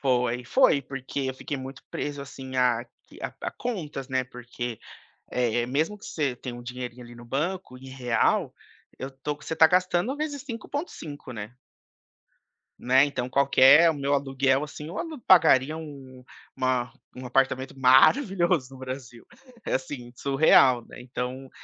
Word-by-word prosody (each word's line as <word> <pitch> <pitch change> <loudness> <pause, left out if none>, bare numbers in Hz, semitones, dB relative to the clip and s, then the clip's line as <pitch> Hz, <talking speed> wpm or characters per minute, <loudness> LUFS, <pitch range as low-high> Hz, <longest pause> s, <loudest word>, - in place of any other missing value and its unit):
Foi 125 -3 +1
foi 145 - +4
porque 135 +1 -5
eu - - -9
fiquei 140 +2 -5
muito 130 0 -8
preso 145 -1 -4
assim 130 -1 -8
a 125 -2 +2 0.2
q - - -15
a - - -4
a - - -3
contas, 155 - -5
né. 130 -1 0
Porque, 120 -2 -7 0.5
eh, 120 -1 0
mesmo 155 +11 -1
que - - -11
você 145 -5 -1
tenha 125 0 -7
um 120 - -9
dinheirinho 125 0 -7
ali 120 0 -12
no 120 0 -12
banco 150 +4 -3
em 135 +1 -11
real, 125 -3 0 0.4
eu 130 - -5
tô 135 +2 -5
que 145 - -16
você 160 - -4
tá 160 - +8
gastando 185 - +1
vezes 290 -2 -4
5.5, 230 - -6
né? 110 +1 -8 1.2
Né. 130 +2 +4
Então 130 -4 -3
qualquer 140 +4 +6
o - - -3
meu 140 0 0
aluguel 135 0 +1
assim 150 0 -9
eu 180 - -6
alu 320 -5 -5
pagaria 155 -5 +5
um 135 -5 -10 0.3
uma 130 -2 0 0.2
um 130 - -8
apartamento 135 +1 0
maravilhoso 170 - +4
no - - -12
Brasil. 130 -3 -8 0.4
É - - -1
assim 130 -2 -4
surreal, 135 -3 +4
né. - - -12
Então, 125 +1 -5
135 Hz, 160 wpm, -26 LUFS, 125-150 Hz, 1.2 s, tá